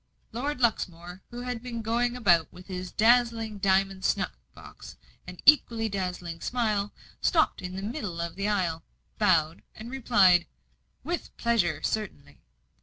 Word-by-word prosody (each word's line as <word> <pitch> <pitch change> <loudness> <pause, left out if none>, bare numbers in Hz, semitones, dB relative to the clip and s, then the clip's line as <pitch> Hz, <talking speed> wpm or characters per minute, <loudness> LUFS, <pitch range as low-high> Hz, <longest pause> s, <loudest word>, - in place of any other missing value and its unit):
Lord 255 +4 -3
Luxmore, 180 -6 -1
who 240 0 -7
had 245 -2 -4
been 235 -2 -5
going 240 +2 0
about 175 -9 +3
with 180 0 -13
his 185 -1 -6
dazzling 225 -2 +2
diamond 195 0 +1
snuff - - 0 0.2
box - - -12 0.3
and 180 -1 -9
equally 235 -6 +5
dazzling 180 -4 -4
smile, 215 -4 -1 0.3
stopped 320 -3 +2
in 180 0 -6
the 195 - -5
middle 205 - -4
of 170 0 -4
the 195 +1 -2
aisle, 175 -6 0 0.4
bowed, 165 -6 +2 0.2
replied, 220 -7 +3 0.6
"With 345 +1 -4
pleasure 175 -10 +1
certainly!" 205 - -4
205 Hz, 135 wpm, -27 LUFS, 180-235 Hz, 0.6 s, equally